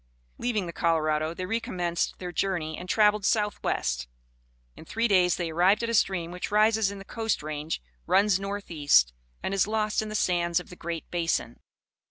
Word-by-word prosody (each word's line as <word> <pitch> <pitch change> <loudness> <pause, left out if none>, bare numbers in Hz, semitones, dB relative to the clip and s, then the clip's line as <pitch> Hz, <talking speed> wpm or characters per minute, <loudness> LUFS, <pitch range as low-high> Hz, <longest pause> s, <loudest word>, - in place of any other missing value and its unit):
Leaving 220 -6 -1
the 170 - -6
Colorado 155 -2 +1
they 185 +2 -5
recommenced 180 -5 -2
their 180 -1 -6
journey 175 -5 -1
and 180 +3 -9
travelled 210 -1 +4
southwest. 195 - 0 0.7
In - - -12
three 230 +8 0
days 180 -4 +4
they 170 -2 -3
arrived 185 +7 +3
at 230 - -1
a - - -2
stream 175 -5 +1
which 180 0 -5
rises 215 0 +3
in 200 - -7
the 195 - -10
coast 225 -6 -2
range, 150 - -4 0.2
runs 200 -1 +4
northeast 170 - +2 0.3
and 190 - -2
is 195 0 +2
lost 215 0 0
in 215 - -5
the 215 - -5
sands 175 -4 +1
of 180 - -11
the - - -9
Great 170 -1 -5
Basin. 170 -2 -1
180 Hz, 180 wpm, -27 LUFS, 170-210 Hz, 0.7 s, travelled